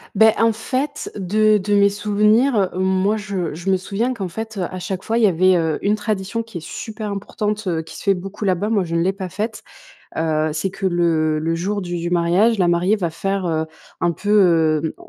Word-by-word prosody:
Bah, 220 +2 +7
en 225 0 +4
fait, 265 +6 -3
de 215 +3 +3
de 205 +1 0
mes 200 0 +5
souvenirs, 210 +2 +2
moi, 190 +3 +1
je 195 -6 -3
je 175 +5 -4
me 190 - +4
souviens 200 +7 -2
qu'en 195 -6 -4
fait, 220 +5 -6
heu, - - -2
à 185 - -5
chaque 185 +1 -4
fois, 225 - -1
il 235 - +4
y - - +6
avait, 185 0 +3
heu, 160 -2 0
une 205 +1 +2
tradition 210 0 -2
qui 225 -6 -8
est - - -13
super 215 +3 -6
importante, 210 +1 -3
heu, 165 -3 0
qui 160 - -11
se - - -9
fait 200 - +4
beaucoup 195 +3 -6
là-bas, 190 +2 0
moi 205 -5 +1
je 165 0 -4
l'ai 170 +3 +2
pas 195 -1 -6
faite. 215 +5 -4 0.6
Heu, 155 -1 0
c'est 165 +5 -2
que 195 - -8
le 165 -3 +1
le 165 +2 -1
jour 200 +5 -2
du 175 -2 -4
du 170 +1 -3
mariage, 180 +6 +3
la 180 - +3
mariée 175 +5 +2
va 175 -5 -2
faire, 195 +3 -2
heu, 160 -1 -1 0.3
un 175 - +2
peu, 205 +5 -4
heu 165 -6 +3
195 Hz, 225 wpm, -20 LUFS, 175-210 Hz, 0.6 s, Bah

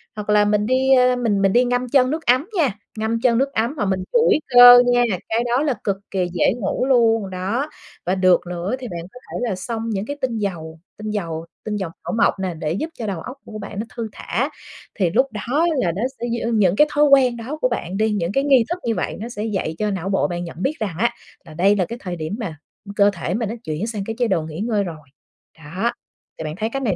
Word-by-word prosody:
hoặc 210 -1 -6
là 210 0 +5
mình 210 0 +2
đi, 260 +3 +3
ơ, 250 -1 +5
mình 225 -5 0
mình 195 -1 +3
đi 245 +1 +4
ngâm 245 0 -1
chân 260 0 +4
nước 320 +1 -3
ấm 255 +7 +3
nha, 280 - +2 0.2
ngâm 225 +1 -1
chân 235 -3 +3
nước 275 +2 0
ấm 230 +6 0
hoặc 205 - 0
mình 190 -1 -1
duỗi 470 -9 +4
cơ 245 -1 +10
nha, 245 0 +4 0.3
cái 225 +2 +1
đó 245 +3 +1
là 290 -4 +1
cực 195 -2 0
kì 185 -2 0
dễ 180 - +2
ngủ 220 +5 -1
luôn. 225 -6 +3
Đó, 200 +10 -2 0.4
và 180 +2 +1
được 185 -1 +4
nữa 180 +6 -3
thì 250 - -6
bạn 175 -2 -5
có 250 - -11
thể 245 -2 -2
là 190 - -1
xông 225 +4 -4
những 200 -2 -2
cái 285 +4 -5
tinh 240 -3 -1
dầu, 165 -6 -4 0.2
tinh 215 0 -5
dầu 165 -6 -3 0.2
tinh 215 - -3
dầu 190 -4 -3 0.2
thảo - - -3
mộc - - +2
nè 185 -2 -2
để 155 -1 -3
giúp 310 - -3
cho 225 - -3
đầu 185 -5 -3
óc 255 +2 -8
của 215 - -8
bạn 200 -1 -7
nó 220 - -2
thư 230 -2 -3
thả, - - -2 0.5
thì 185 -4 +1
lúc 265 +10 +2
đó 250 +10 0
là 180 -9 +1
nó 195 - -3 0.2
sẽ - - -3 0.2
giư 230 - -1
những 200 -5 +3
cái 300 +7 +5
thói 295 - +4
quen 265 -4 +5
đó 255 +7 -5
của 255 - +3
bạn 195 -5 -3
đi, 220 0 +2
những 180 -4 -1
cái 275 +6 +1
nghi 270 -4 +5
thức 345 +1 -2
như 230 -1 0
vậy - - -3
nó 225 +3 -5
sẽ 215 -3 -5
dạy 190 -7 -2
cho 210 -1 -1
não 190 -1 -3
bộ 195 - +1
bạn 175 -1 -4
nhận 170 0 -8
biết 280 - +1
rằng 205 -7 -3
á 235 +3 +1 0.3
là 160 - -12
đây 190 +6 +3
là 185 -4 +1
cái 235 +5 -7
thời 180 -2 -4
điểm 160 +4 -4
mà, 175 -9 -5 0.3
ư, 200 - -8
cơ 205 -1 +5
thể 175 0 -3
mình 220 -1 -1
nó 230 - -4
chuyển 160 +6 -3
sang 215 -4 -4
cái 225 - -4
chế 240 - +2
độ 190 -6 +1
nghỉ 155 +2 -7
ngơi 215 -2 0
rồi. 155 -5 -8 0.5
Đó, 180 +9 -2 0.5
thì - - -5
bạn 155 0 -4
thấy 220 +2 -1
cái 270 - -3
này 225 -9 0
215 Hz, 265 wpm, -21 LUFS, 185-245 Hz, 0.5 s, cơ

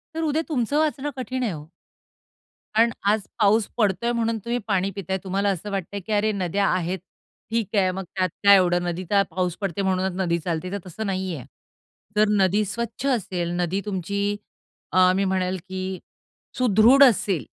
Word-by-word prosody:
तर 325 - -2
उद्या 310 0 +1
तुमचं 275 0 0
वाचणं 295 -2 0
कठीण 255 0 -3
आहे 225 - 0
हो. 150 -3 -7 1.1
कारण 230 +1 +5 0.2
आज 215 0 +2 0.2
पाऊस 215 0 +4
पडतोय 220 +2 +1
म्हणून 230 -1 0
तुम्ही 240 +1 0
पाणी 195 -2 +1
पिताय. 190 -1 -2
तुम्हाला 195 +1 0
असं 200 +2 -3
वाटतंय, 195 +1 -3
की 195 +4 -9
"अरे! 210 +1 +2
नद्या 195 0 0
आहेत, 185 0 -1 0.5
ठीक 225 -2 -2
आहे, 190 -2 +3
मग 190 +1 -5
त्यात 185 -1 +1
काय 200 0 +9
एवढं? 175 -2 +3
नदीचा 185 +3 +1
पाऊस 180 -1 -1
पडते 195 -1 -2
म्हणूनच 190 -1 0
नदी 170 -2 +1
चालते," 170 +2 -3
तर 200 - -2
तसं 200 +5 -6
नाही 190 -2 -2
आहे. 130 - -8 0.7
जर 210 0 +4
नदी 195 +3 +3
स्वच्छ 235 +5 -4
असेल, 180 -5 -3
नदी 185 +3 -1
तुमची 200 +1 -2 0.5
अ, 185 0 +5
मी 195 - +1
म्हणेल 185 -1 0
की 185 0 -4 0.6
सुदृढ 245 +3 +6
असेल 200 - +3
195 Hz, 170 wpm, -24 LUFS, 185-220 Hz, 1.1 s, काय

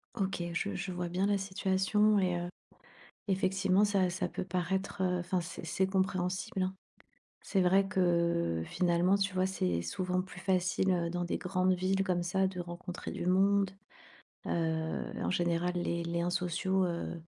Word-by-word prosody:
OK, 195 -4 -1
je 200 +4 -2
je 185 +1 -4
vois 175 0 -3
bien 180 +3 0
la 205 0 +2
situation, 195 +2 +2
et 180 -2 +1
heu, 175 0 -3 0.8
effectivement 190 0 +2
ça 200 -3 +2
ça 175 - -2
peut - - -4
paraître, 190 +2 -2
heu, 180 -1 +1
enfin, 180 +1 -1
c'est 170 +1 -7
c'est 190 - +1
compréhensible, 190 -1 -1
hein. 185 0 -1 0.7
C'est 195 - +2
vrai 190 +2 +4
que, 170 - +1
finalement, 175 - +2
tu 195 -1 0
vois, 185 0 +2
c'est 90 - 0
souvent 185 - -1
plus 180 -1 -11
facile, 185 0 +1
heu, 170 -2 +1
dans 175 +1 -2
des 175 - -1
grandes 185 0 +1
villes 190 +2 +1
comme 180 -2 0
ça 190 +2 +1
de 185 -1 -5
rencontrer 175 +1 -6
du - - -4
monde. 195 +1 +3 0.8
Heu, 160 -1 -1
en - - 0
général, 175 0 +1
les 170 -1 -1
liens 170 +1 -1
sociaux 185 +1 0
heu, 170 -1 -3
185 Hz, 165 wpm, -32 LUFS, 175-190 Hz, 0.8 s, vrai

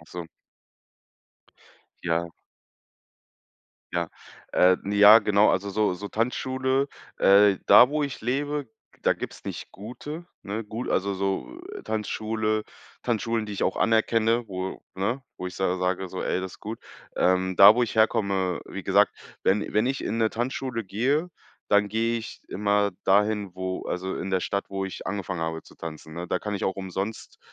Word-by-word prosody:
Ach - - -18
so. - - -7 1.8
Ja. 85 0 0 1.6
Ja, 85 -2 -1 0.4
äh, 90 0 +5
ja, 105 +2 +8
genau, 105 0 +4
also 100 +2 -1
so 105 -2 +1
so 100 +3 -7
Tanzschule 130 +3 0 0.3
äh, 100 0 +6
da, 125 - +9
wo 150 +1 -1
ich 140 -3 -4
lebe, 145 +3 -2 0.3
da - - +4
gibt's - - -8
nicht - - -6
gute, 145 - -8 0.2
ne? 110 +3 -4
Gut, 110 +4 -5
also, 100 +1 +1
so 95 - -3 0.2
Tanzschule 110 0 -1 0.4
Tanzschulen, 115 -1 -1
die 105 - -6
ich 100 - -3
auch - - +1
anerkenne, 115 +1 +2
wo, 95 -1 -5
ne, 110 +8 -1
wo 90 - -5
ich 90 - -6
sa 95 -1 0
sage 90 +1 -1
so: 95 - -6
„Ey, - - 0
das 95 0 -5
ist - - -15
gut.“ 110 +2 -6 0.3
Ähm, 95 0 +2
da, 100 +2 +10
wo 125 - +3
ich 115 - -6
herkomme 100 -5 +2
wie - - -7
gesagt, - - +3 0.3
wenn 105 +2 +1
wenn 105 +3 +2
ich 135 +1 -1
in 115 - -2
'ne 110 -1 +2
Tanzschule 120 0 -3
gehe, 130 - 0 0.4
dann 105 0 +4
gehe 115 +2 0
ich 110 - -9
immer 100 0 +1
dahin, 105 -1 +2
wo 95 0 -4
also 95 +1 -3
in 95 - -4
der 95 -1 +1
Stadt, 100 +2 -2
wo 95 0 -3
ich 95 - -7
angefangen 95 -3 -3
habe 80 -1 -3
zu - - -18
tanzen, 80 -1 -8
ne? 85 +1 -5
Da - - -1
kann 105 -1 -3
ich - - -3
auch 95 - 0
umsonst, 95 +3 -5
105 Hz, 170 wpm, -26 LUFS, 95-115 Hz, 1.8 s, da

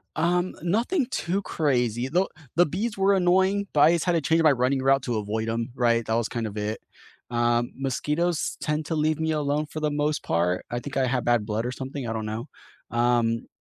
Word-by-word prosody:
Um, 175 +3 +1
nothing 240 - +1
too 190 +4 -2
crazy, 125 - 0
though 180 +7 +1 0.3
the 175 - +5
bees 205 +7 -3
were 195 +1 +4
annoying, 190 +2 +2
but 145 - +3
I 155 +3 +7
just 170 - 0
had 180 - +2
to 165 -2 +1
change 165 +2 +2
my 155 - +6
running 130 +1 +1
route 135 +1 +3
to 120 -3 -1
avoid 110 +2 -2
'em, 115 +2 -2
right? 115 -2 +2
That 110 - -1
was 115 0 0
kind 115 -2 -3
of 105 - -6
it. 105 +1 -3 0.5
Um, 120 0 +1
mosquitoes 150 +5 -1
tend 150 0 -1
to 160 - -1
leave 155 0 +1
me 160 0 0
alone 150 0 0
for 155 +1 -7
the 155 -1 0
most 150 +1 0
part, 90 +2 0
I 120 - -2
think 140 +2 -6
I 130 - +2
have 125 -1 -1
bad 120 -3 +2
blood 110 +2 -1
or 125 - -2
something, 135 0 -5
I 115 - -2
don't 110 -1 -3
know, 110 +2 -4 0.4
um, 120 -1 +1
135 Hz, 220 wpm, -25 LUFS, 120-165 Hz, 0.5 s, I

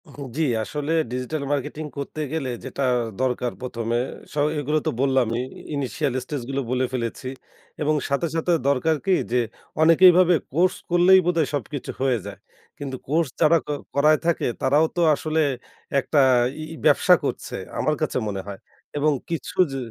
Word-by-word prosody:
হু, 145 - -11 0.2
জি। - - +1 0.2
আসলে 150 +5 -4 0.2
digital 130 +4 -3
marketing 150 +2 -2
করতে 140 +2 -5
গেলে 150 -5 -2 0.2
যেটা 130 +1 -3 0.4
দরকার 125 -1 0
প্রথমে। 120 -2 -2 0.4
স - - -11 0.2
এগুলো 150 +2 0
তো - - +2
বললামই, 130 -4 +2 0.3
ইনিশিয়াল 140 0 -1
স্টেজগুলো 135 0 -3
বলে 130 0 +1
ফেলেছি। 120 +1 -3 0.5
এবং 155 +1 +2
সাথে, 140 +5 0
সাথে 165 +2 0 0.2
দরকার 140 +4 +2
কী? 190 - +3 0.2
যে, 125 - +2 0.4
অনেকেইভাবে 175 +2 +7 0.2
কোর্স 180 +4 +3
করলেই 175 +2 +6
বোধহয় 170 -4 +2
সবকিছু 145 -1 -4
হয়ে 130 -2 +2
যায়। - - -8 0.4
কিন্তু 135 -2 -5
কোর্স 160 +3 +1
যারা 165 +1 +6
ক - - -39 0.3
করায় 150 +2 +4
থাকে, 170 -1 +1 0.2
তারাও 145 +4 +4
তো 175 - +1
আসলে 155 +2 -2 0.6
একটা 145 +2 +1 0.5
ই - - -7
ব্যবসা - - +5
করছে, - - -3 0.2
আমার - - +1
কাছে - - 0
মনে 100 -2 -3
হয়। 100 -1 -7 0.4
এবং 150 +1 +3 0.2
কিছু 165 -2 -4
জি 135 - -3
145 Hz, 155 wpm, -23 LUFS, 130-160 Hz, 0.6 s, অনেকেইভাবে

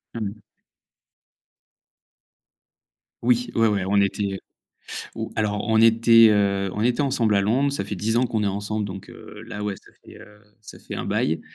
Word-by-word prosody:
Mmh. 105 -1 -5 2.8
Oui, 125 0 +2
ouais, 115 0 +4
ouais, 105 -3 0
on 100 0 +3
était, 100 0 0
heu 95 - -4 0.8
oh, - - -5
alors 105 -1 -1
on 110 0 +3
était, 115 0 +6
heu, 100 -2 +1
on 105 - -2
était 125 +4 +1
ensemble 120 -7 +1
à - - +3
Londres. 125 +8 +1
Ça 140 -8 -3
fait 105 - -5
10 110 +4 -1
ans 125 +1 +3
qu'on 110 -3 -2
est - - 0
ensemble 105 +2 -3
donc, 95 -1 -8
heu, - - -12
là 105 - -6
ouais, 105 -2 -3
ça - - -20
fait, - - -14
heu, 105 0 -16 0.2
ça 105 - -13
fait - - -7
un - - -4
bail. 80 +1 0
105 Hz, 180 wpm, -23 LUFS, 100-115 Hz, 2.8 s, était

